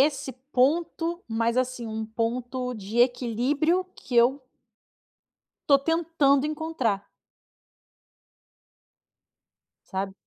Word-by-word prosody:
é 285 - +6
esse 275 -2 -4 0.2
ponto, 330 +5 +1
mas 230 +1 0
assim, 255 -2 -1
um 220 0 -4
ponto 245 +3 -2
de 215 +1 -5
equilíbrio 260 +8 +2
que 250 - -8
eu 255 +4 +4 1.3
tô 280 - +7
tentando 305 -2 +2
encontrar. 300 -10 -2 2.8
Sabe? 190 0 -3
255 Hz, 90 wpm, -26 LUFS, 230-300 Hz, 2.8 s, tô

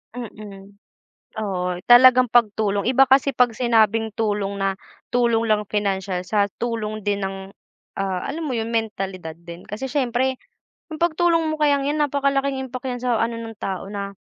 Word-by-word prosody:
Mm. 205 -4 -10 0.6
Oo, 180 -4 -2
talagang 255 +1 +8
pagtulong. 210 -3 +2
Iba 265 +1 +5
kasi 275 +1 +4
pag 250 -1 +4
sinabing 225 -2 +2
tulong 205 -2 -1
na 195 -1 -1 0.3
tulong 235 -2 +2
lang 210 0 +3
pinansiyal, 195 -3 -2
sa 205 +2 +1 0.2
tulong 215 -3 -3
din 200 -1 -1
ng, 195 0 -5 0.6
ah, 190 -2 -2
alam 315 +3 -4
mo 265 - -2
yun 225 -1 -2
mentalidad 195 -7 -3
din. 170 +1 -12
Kasi 215 +6 -5
syempre, 260 -1 0 0.5
yung 310 - -6
pagtulong 335 0 +2
mo - - -1
kayang 285 -2 +2
yan, 300 +1 -1
napakalaking 280 -1 0
impact 255 0 -7
yan 245 - -4
sa 240 -3 +1
ano 230 0 -1
ng 225 -1 -7
tao. 190 -2 -4
Na 200 -1 -5
225 Hz, 160 wpm, -22 LUFS, 200-255 Hz, 0.6 s, talagang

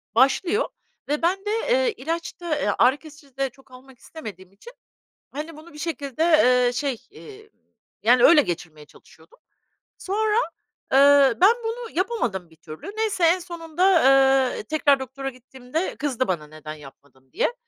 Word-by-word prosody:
Başlıyor 340 - +2 0.4
ve 295 +2 -1
ben 380 +4 0
de, 415 - -1 0.2
eee, - - +2
ilaç 330 +4 -5
da, 340 -3 -1
eee, 205 - 0
ağrı 255 +4 +4
kesici 295 -4 -17
de 270 -1 0
çok 265 +1 -24
almak 255 0 -16
istemediğim 195 - -11
için, 340 - -15 0.6
hani, 305 +3 -7
bunu 315 +2 -14
bir 300 - -13
şekilde, 300 -3 -4
eee, 250 -7 +4
şey, 260 -2 -3
eee, 430 0 -14 0.5
yani 240 +2 +4
öyle 325 -3 +7
geçirmeye 160 - -6
çalışıyordum. - - -21 0.6
Sonra, 425 +3 -1 0.6
ııı, 275 -2 +6
ben 400 +5 +7
bunu 455 +1 -5
yapamadım 235 - -2
bir 160 - -21
türlü. 155 - -10
Neyse, 430 -5 -1
en 335 +3 +4
sonunda, 340 -1 -5 0.7
ııı, - - -6
tekrar 285 +2 +2
doktora 270 +1 -6
gittiğimde 260 +5 -6
kızdı 260 -3 -2
bana 160 -5 -3
neden 155 0 -9
yapmadın 135 -2 -17
diye. - - 0
280 Hz, 155 wpm, -23 LUFS, 245-345 Hz, 0.7 s, öyle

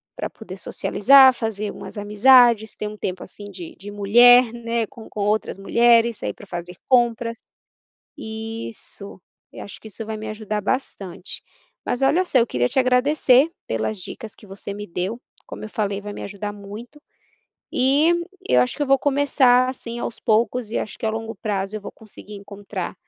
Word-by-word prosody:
para - - -3
poder 195 -4 -10
socializar, 265 +7 +5
fazer 215 -4 -3
umas - - -10
amizades, 220 +1 +4
ter 210 - -4
um 210 - -8
tempo, 185 -3 -4
assim, 205 - -10
de 180 -4 -9
de 205 +3 -9
mulher, 240 +4 +6
né, 230 -1 -2
com 235 -5 -13
com 210 - -6
outras 210 -1 0
mulheres, 235 +2 +3
sair - - -4
para 205 - -14
fazer 175 0 -7
compras. 235 -2 +1 0.7
Isso, 220 -3 -3 0.3
eu - - -8
acho 200 - -10
que 220 - -12
isso 220 +1 -6
vai 220 0 -5
me 215 - -7
ajudar 215 -1 -4
bastante. 195 -6 -4 0.4
Mas 245 - -2
olha 295 +8 +3
só, 275 - +3
eu 235 - +3
queria 125 - 0
te - - -7
agradecer 260 +2 +4 0.2
pelas 110 - -2
dicas 210 +4 -9
que - - -16
você 195 +1 -8
me 205 +1 -7
deu, 185 +5 -4 0.3
como - - -9
eu 215 - -7
falei, 205 -2 -2
vai 205 0 -7
me - - -8
ajudar 205 +1 -5
muito 210 +8 -11 0.7
e 285 +6 +3 0.4
e - - +1
eu 125 - +6
acho 125 - 0
que 295 - -1
eu - - -5
vou 275 -1 +4
começar, 265 -3 +3
assim, 240 -2 -7
aos 230 - -5
poucos 230 +1 +1
e 230 - -2
acho - - -5
que - - -4
a 220 - +2
longo 225 +1 -4
prazo 200 -1 -3
eu - - -11
vou - - -9
conseguir 215 -1 -12
encontrar 200 -2 -7
220 Hz, 185 wpm, -22 LUFS, 205-245 Hz, 0.7 s, mulher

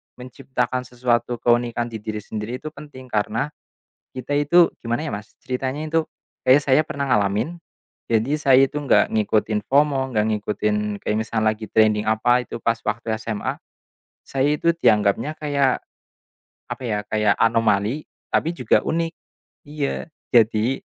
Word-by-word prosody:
menciptakan 125 0 -3
sesuatu 120 -1 0
keunikan 120 0 +1
di 110 - -5
diri 105 0 -5
sendiri 110 +4 -5
itu 155 +1 -7
penting 145 -4 -12
karena, 110 +7 -1 0.6
kita 130 +2 -5
itu 165 +4 +5
gimana 120 +7 -2
ya - - -3
Mas, 105 +1 -7
ceritanya 130 +4 -3
itu 165 +1 +1 0.4
kayak 130 +3 +6
saya 140 +2 +5
pernah 140 -2 -3
ngalamin. 105 - 0 0.5
Jadi, 115 +7 +1
saya 135 -1 +6
itu 150 - -5
nggak 140 - +3
ngikutin 110 0 +1
FOMO, 140 -1 +2
nggak 105 0 +2
ngikutin 105 0 -1 0.3
kayak 105 - -1
misal 110 0 -1
lagi 110 0 0
trending 110 -1 +3
apa 120 +3 +3
itu - - -6
pas 115 - +2
waktu 110 +1 -2
SMA. 110 -3 -3 0.7
Saya 135 +2 +1
itu 170 +2 +2
dianggapnya 110 +1 +2
kayak, 140 -3 +1 0.9
apa - - -6
ya, 105 -3 -1
kayak 105 -1 +3
anomali, 115 +3 +2 0.3
tapi 165 - +2
juga - - +3
unik. 165 0 0 0.6
Iya. 150 -2 -3 0.3
Jadi, 115 +2 +3
120 Hz, 145 wpm, -22 LUFS, 110-140 Hz, 0.9 s, kayak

